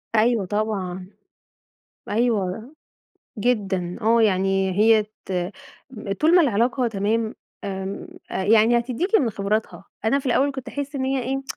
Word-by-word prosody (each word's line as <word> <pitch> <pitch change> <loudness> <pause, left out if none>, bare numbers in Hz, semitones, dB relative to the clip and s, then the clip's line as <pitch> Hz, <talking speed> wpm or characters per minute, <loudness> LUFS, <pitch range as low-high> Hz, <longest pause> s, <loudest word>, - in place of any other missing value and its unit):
أيوه 220 -2 +3
طبعًا، 190 -3 -3 1.0
أيوه 220 +1 0 0.7
جدًا، 195 -6 0
آه 230 +1 +4
يعني 195 -2 +2
هي 220 0 +5 0.2
ت - - -6 0.9
طول 320 +3 +4
ما 360 - +7
العلاقة 245 0 +1
تمام، 220 +2 -1 0.3
آمم، 195 - -5 0.2
أ - - -2
يعني 225 +3 +5
هتديكِ 255 - -2
من 245 -5 +1
خبراتها، 210 +2 -2 0.2
أنا 250 +6 +3
في 275 - -7
الأول 270 +3 +2
كنت 265 -3 -7
أحس 285 +1 -5
إن 265 -2 -1
هي 265 -1 0
إيه 270 +2 -2
225 Hz, 135 wpm, -23 LUFS, 200-255 Hz, 1.0 s, ما